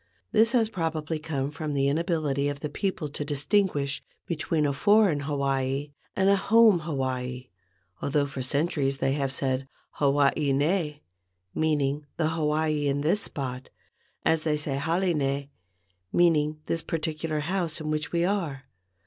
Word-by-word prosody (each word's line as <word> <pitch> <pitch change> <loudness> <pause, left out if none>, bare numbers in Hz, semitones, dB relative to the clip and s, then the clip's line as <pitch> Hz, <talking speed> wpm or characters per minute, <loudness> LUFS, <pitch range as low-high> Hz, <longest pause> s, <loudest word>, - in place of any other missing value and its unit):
This 225 +3 +4
has 230 -3 +4
probably 160 -5 -2
come 145 -3 -2
from 150 0 -4
the 140 -1 +2
inability 150 -2 0
of 145 0 -5
the 150 - -3
people 190 -6 -2
to 145 - -5
distinguish 145 0 0 0.2
between 160 -2 0
a 140 - +1
foreign 205 0 +4
Hawaii 140 -1 -1 0.2
and 190 0 +2
a 200 - +6
home 215 -1 +5
Hawaii, 130 -5 -3 0.5
although 145 0 +1
for 140 -1 -5
centuries 140 0 0
they 135 0 +1
have 135 -1 0
said 130 0 -1 0.2
"Hawaii 140 0 +2
nei," 150 +1 0 0.5
meaning 150 -2 0
"the 155 -2 +1
Hawaii 155 -1 0
in 140 0 0
this 165 +8 +2
spot," 130 -2 -5 0.6
as 160 -1 +3
they 155 -1 +1
say 145 -2 -2
"hale 170 +5 +1
nei," 140 -1 -1 0.6
meaning 155 -3 +3
"this 165 - -1
particular 155 -1 -2
house 170 0 -1
in 155 -1 -3
which 155 -1 -2
we 170 0 +2
are." 170 -9 -1
150 Hz, 150 wpm, -27 LUFS, 140-165 Hz, 0.6 s, a